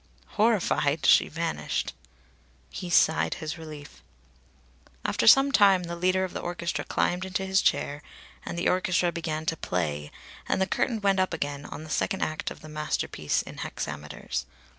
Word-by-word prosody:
Horrified, 175 -9 +2
she - - +6
vanished. 165 +1 -2 0.8
He 180 - -6
sighed 160 -2 +3
his 160 -1 -5
relief. 150 - -10 1.0
After 115 - +1
some 270 - +8
time, 195 -6 +5
the 170 0 -5
leader 185 +2 +2
of 185 - -4
the - - -3
orchestra 170 -4 -3
climbed 180 +1 0
into 190 0 -2
his 190 0 +3
chair, 145 +1 0 0.4
and 170 - -5
the 170 - 0
orchestra 180 -1 +2
began 160 -2 -3
to 165 - 0
play, 75 - -2 0.4
and - - +2
the 190 - +3
curtain 225 +3 -1
went 195 -1 +3
up 185 -3 +1
again, 145 -2 -4
on 155 - -8
the 155 - -9
second 195 - 0
act 155 0 -2
of - - -10
the 155 - -11
masterpiece 150 - -1
in - - -10
hexameters. 70 -3 -5
170 Hz, 160 wpm, -27 LUFS, 145-185 Hz, 1.0 s, some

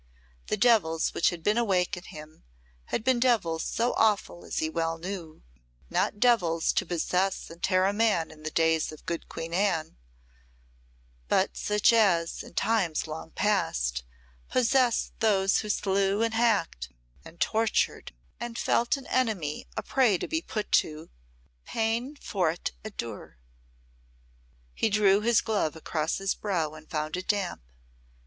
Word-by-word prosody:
The - - -1
devils 195 -10 +3
which - - +3
had 170 -2 -7
been 210 +5 +2
awake 190 -6 +1
in 180 - -8
him 155 +1 -12 0.4
had 220 - -3
been 255 0 +2
devils 215 -10 +2
so 235 +2 0
awful 210 -5 +1
as - - -6
he 155 - +1
well 165 0 -2
knew 170 -2 -7 0.5
not 205 - 0
devils 180 -9 +3
to - - 0
possess 180 +3 -1
and 170 +1 -13
tear 185 0 +3
a 200 - +2
man 205 -7 +1
in 155 - -15
the 155 - -3
days 160 0 +1
of 155 - -13
good 170 -1 -4
Queen 165 +1 -6
Anne, 175 - 0 1.3
but - - +1
such 210 +2 +3
as, 180 -7 +2
in - - -13
times 195 -9 +1
long 160 +1 -7
past, 65 - 0 0.5
possessed 255 -1 +2
those 195 -3 +3
who 215 - -5
slew, 200 +1 +1
and 230 0 0
hacked, 205 - +1 0.3
and 170 - -14
tortured, 225 0 0 0.3
and 235 -1 -5
felt 240 +4 +1
an 275 - -10
enemy 210 -13 -1
a 220 - -2
prey 240 -5 +3
to - - -4
be 320 0 -1
put 215 -10 -5
to 155 +1 +1 0.5
peine 230 - -1
forte 180 - -1
et 215 -1 -9
dure. 110 - -7 1.4
He 220 - +1
drew 205 -1 +4
his 235 +1 +3
glove 205 -10 -1
across 160 0 -2
his 195 0 0
brow 170 -7 -2
and 155 0 -13
found 155 +1 -2
it 185 - -6
damp. 200 - -1
195 Hz, 155 wpm, -28 LUFS, 160-225 Hz, 1.4 s, drew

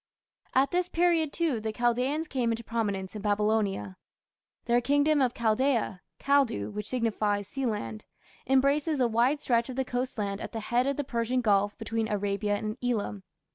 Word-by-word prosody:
At 270 +1 +4
this 360 0 0
period, 335 -3 +2
too, 315 -9 0
the 220 0 -3
Chaldaeans 250 +7 0
came 250 -5 0
into 230 +1 -3
prominence 205 -4 -2
in 210 - -5
Babylonia. 205 - 0 0.7
Their 240 0 +3
kingdom 285 +3 +3
of 250 -2 +1
Chaldaea 230 -3 +1 0.2
(Kaldu, 270 - +2
which 210 0 -5
signifies 210 -4 0
Sealand) 210 - -3 0.4
embraces 280 +3 +2
a 250 - +4
wide 240 +6 +2
stretch 235 -2 +1
of 255 - -5
the 265 0 -1
coast 250 0 -3
land 200 -1 -2
at - - -6
the 225 - -3
head 240 +4 +1
of 280 - 0
the 290 - 0
Persian 245 0 -1
Gulf 205 -2 +2
between 225 0 -2
Arabia 205 0 0
and 215 +2 -4
Elam. 220 -4 -1
235 Hz, 170 wpm, -28 LUFS, 210-270 Hz, 0.7 s, At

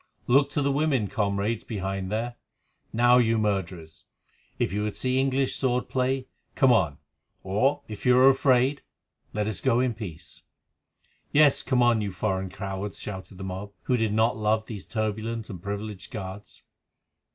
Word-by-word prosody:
Look 140 +3 +4
to 145 - -1
the 140 - +2
women, 135 -7 +1
comrades 100 +1 -1
behind 95 -3 -4
there. 120 +3 -2 0.5
Now, 120 +2 +5
you 115 -1 +3
murderers, 90 -7 -3 0.5
if - - 0
you 105 - -1
would 105 -1 -3
see 130 0 +1
English 135 0 +1
sword 125 -2 0
play, 130 0 0 0.3
come 130 -2 +5
on, 80 -11 +2 0.5
or, 130 +10 +1
if 105 -2 -8
you 125 -1 +5
are 130 +1 +7
afraid, 135 0 +3 0.5
let 105 0 -1
us 100 -5 -3
go 120 -2 +3
in 125 -1 +1
peace." 85 -8 -9 0.9
"Yes, 145 -1 +5
come 130 -2 +2
on, 120 -2 +4
you 100 -1 -2
foreign 95 0 -2
cowards," 95 +1 -5
shouted 95 -2 -7
the 95 - -7
mob, 95 +2 -6
who 125 - +1
did 110 -3 +1
not 110 +3 +2
love 110 0 +1
these 105 -5 -8
turbulent 110 +1 -3
and 90 -4 -8
privileged 100 0 -5
guards. 100 -3 -8
110 Hz, 165 wpm, -26 LUFS, 100-125 Hz, 0.9 s, are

